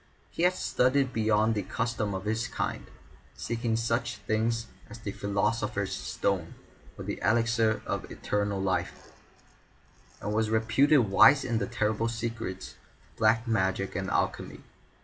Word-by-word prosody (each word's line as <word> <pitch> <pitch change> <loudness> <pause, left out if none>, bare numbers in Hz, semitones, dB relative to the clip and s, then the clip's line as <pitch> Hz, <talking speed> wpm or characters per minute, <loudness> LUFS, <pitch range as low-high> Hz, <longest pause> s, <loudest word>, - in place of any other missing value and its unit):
He - - -4
had 180 +1 +4
studied 130 +2 +1
beyond 110 0 +2
the 105 - -1
custom 110 0 -2
of 95 +2 -5
his 110 +2 -1
kind, - - -4 0.5
seeking 115 -1 -2
such 115 0 -1
things 115 +1 -1 0.2
as 115 - -9
the 110 -3 -5
Philosopher's 100 0 -1
Stone, 90 -4 -2 0.4
or - - -6
the - - -4
Elixir 115 +1 +2
of - - -3
Eternal 100 -1 -2
Life, 90 -2 -2 1.1
and 105 - -3
was 110 0 +1
reputed 110 +2 +3
wise 135 +8 +7
in 120 -3 0
the 100 - -2
terrible 110 +2 0
secrets 115 -4 -4 0.4
of - - -30
Black 110 +2 +3
Magic 95 -3 0
and 95 +1 -2
Alchemy. - - -2
110 Hz, 140 wpm, -28 LUFS, 100-115 Hz, 1.1 s, wise